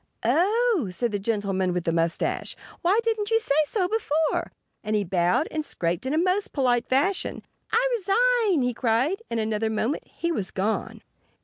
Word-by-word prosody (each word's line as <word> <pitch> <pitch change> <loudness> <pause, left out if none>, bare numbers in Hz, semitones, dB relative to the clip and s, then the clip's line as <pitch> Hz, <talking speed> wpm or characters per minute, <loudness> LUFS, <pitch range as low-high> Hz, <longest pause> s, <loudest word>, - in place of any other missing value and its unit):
"Oh!" 420 - +2
said 230 +6 -2
the 205 - -1
gentleman 195 -3 -1
with 180 -1 -1
the 165 - 0
mustache. 165 0 -1 0.3
"Why 385 +5 +3
didn't 440 -2 0
you 450 - +4
say 445 -11 0
so 375 0 0
before?" 320 -7 0 0.3
And 215 0 -1
he 210 - +1
bowed 180 - +1
and 310 -1 -2
scraped 175 - -2
in 270 - -1
a - - +1
most 370 +4 +1
polite 245 -3 +1
fashion. 345 +9 0 0.3
"I 480 +3 +3
resign!" 455 - +2
he 250 0 0
cried. 250 - +1
In 230 - -2
another 220 0 0
moment 220 +6 -2
he 340 - -3
was 205 - -2
gone. 205 +3 -2
270 Hz, 175 wpm, -25 LUFS, -, 0.3 s, you